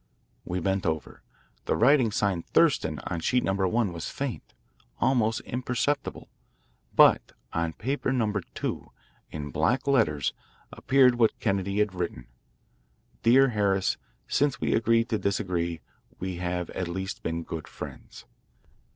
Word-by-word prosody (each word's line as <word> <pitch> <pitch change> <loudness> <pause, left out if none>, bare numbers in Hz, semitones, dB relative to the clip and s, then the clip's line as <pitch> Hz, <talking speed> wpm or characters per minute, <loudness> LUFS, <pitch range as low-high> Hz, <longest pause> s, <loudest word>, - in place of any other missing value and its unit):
We 90 +1 -2
bent 95 +1 0
over. 80 -1 -3 0.4
The - - +1
writing 125 -2 +4
signed 95 -4 -1
"Thurston" - - +3
on 85 - -2
sheet 125 +9 +1
number 95 0 +1
one 105 -1 +1
was 85 - -5
faint, 140 -4 -5 0.4
almost 115 -4 +2
imperceptible, 125 +3 -2 0.7
but - - +5 0.2
on 85 -1 -1
paper 130 - -2
number 110 -6 0
two, - - -4 0.4
in 75 -2 -6
black 95 - +1
letters, 110 - +2 0.4
appeared 130 -3 +3
what 115 -2 +3
Kennedy 100 -2 -1
had 105 -2 +2
written: 85 -9 -4 0.5
" - - -39
Dear 135 +3 +6
Harris: 100 -4 +1 0.3
Since 145 -1 +1
we - - 0
agreed 115 0 +3
to 110 - 0
disagree 85 -4 -1 0.4
we 95 -1 -4
have 90 -1 -3
at 90 - -3
least 95 +2 -4
been 85 +1 -3
good 80 -1 -6
friends." - - -10
100 Hz, 135 wpm, -27 LUFS, 85-120 Hz, 0.7 s, Dear